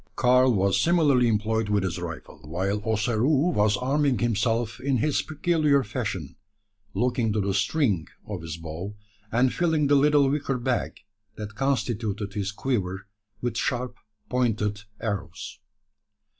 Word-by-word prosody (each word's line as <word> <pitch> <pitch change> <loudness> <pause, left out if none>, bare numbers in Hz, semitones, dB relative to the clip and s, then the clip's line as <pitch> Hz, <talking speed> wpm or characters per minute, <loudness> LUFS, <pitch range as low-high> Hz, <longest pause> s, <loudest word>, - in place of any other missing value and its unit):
Karl 125 +1 +4
was 100 -3 +2
similarly 150 -8 +4
employed 110 0 0
with 100 -2 +2
his 90 -1 -2
rifle, 85 -2 -7
while 95 +6 -2
Ossaroo 120 - +2
was 105 0 +3
arming 135 +1 +1
himself 115 +1 0
in 135 0 +1
his 145 +5 +1
peculiar 155 -3 +2
fashion, 100 - -4 0.6
looking 120 -2 +1
to 105 - 0
the 100 -1 0
string 100 - +1 0.2
of 100 -5 -5
his 80 0 -6
bow, 85 +5 -6 0.4
and 125 +2 +3
filling 160 -4 +1
the 145 +1 +4
little 145 0 +5
wicker 140 -1 0
bag, 125 0 -2 0.3
that 105 0 -7
constituted 110 -5 -1
his 100 -1 -2
quiver, 100 -5 -2 0.4
with 120 -1 -2
sharp 125 -1 -1 0.3
pointed 105 -4 0
arrows. 105 -4 -5
115 Hz, 135 wpm, -26 LUFS, 100-135 Hz, 0.6 s, little